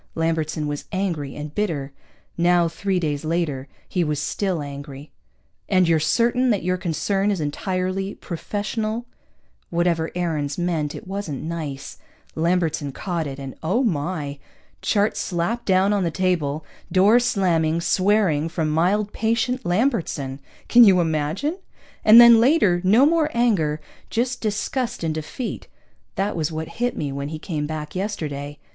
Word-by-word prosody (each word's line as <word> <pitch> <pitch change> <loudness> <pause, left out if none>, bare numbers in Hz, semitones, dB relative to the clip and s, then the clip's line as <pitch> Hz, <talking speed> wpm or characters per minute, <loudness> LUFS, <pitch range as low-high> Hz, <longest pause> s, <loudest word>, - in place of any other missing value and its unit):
Lambertson 160 -2 -1
was 145 -1 -4
angry 170 -8 -2
and 150 0 -7
bitter. 155 -9 -2 0.4
Now, 175 0 +3
three 185 +3 -1
days 150 -3 -2
later, 155 -5 -1 0.2
he 180 - 0
was 150 -2 -1
still 175 +1 -1
angry. 140 0 -9 0.6
"And 185 -2 +4
you're 165 -1 +3
certain 240 +10 +2
that 205 -6 +1
your 180 +1 0
concern 195 +4 0
is 200 -3 0
entirely 185 +5 -2
professional?" 215 +5 -3 0.6
(Whatever 170 -1 +1
Aarons 155 -5 -2
meant, 165 -4 -1
it - - -9
wasn't 190 -7 -4
nice. 155 -4 -5 0.3
Lambertson 160 -3 0
caught 170 -2 -3
it, 135 -1 -6
and 135 -1 -7
oh, 190 +11 +1
my! 150 - -2 0.4
Chart 205 0 +1
slapping 180 +7 -2
down 190 +1 +3
on 200 -2 +1
the 170 - +1
table, 160 -4 -1 0.3
door 200 +6 +5
slamming, 170 -9 +1
swearing 185 -4 +2
from 160 -2 -1
mild, 195 +6 +1
patient 230 +3 0
Lambertson, 175 - 0 0.3
can 240 0 +8
you 195 -4 +6
imagine? 165 - -1 0.4
And 220 +2 +9
then 235 -1 +9
later, 230 - +4
no 215 +9 +5
more 315 0 +3
anger, 185 -11 +2 0.3
just 245 +2 -1
disgust 220 +2 -2
and 160 -1 0
defeat. 155 - -5 0.5
That 200 +2 -1
was 160 -2 -1
what 160 0 -4
hit 245 0 0
me 145 -2 -2
when 140 +1 -4
he 155 - -5
came 155 -2 -3
back 155 -1 -5
yesterday. 150 -8 -4
175 Hz, 145 wpm, -23 LUFS, 155-205 Hz, 0.6 s, And